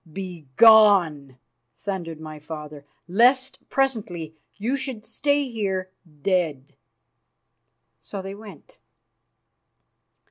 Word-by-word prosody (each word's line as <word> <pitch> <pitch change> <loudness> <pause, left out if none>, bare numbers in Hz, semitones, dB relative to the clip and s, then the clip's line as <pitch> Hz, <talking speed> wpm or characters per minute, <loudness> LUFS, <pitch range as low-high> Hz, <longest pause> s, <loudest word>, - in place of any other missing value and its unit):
"Begone!" 175 - +4 0.4
thundered 175 -5 -5
my 155 -1 -9
father, 150 -1 -9 0.2
"lest 255 +7 +3
presently 200 - -1 0.2
you 230 +7 -1
should 260 -5 -5
stay 285 -1 0
here 190 -5 -3 0.3
dead." 160 -8 0 1.3
So 200 - -8
they 195 +1 -6
went. 210 0 -14
190 Hz, 80 wpm, -24 LUFS, 155-225 Hz, 1.3 s, Begone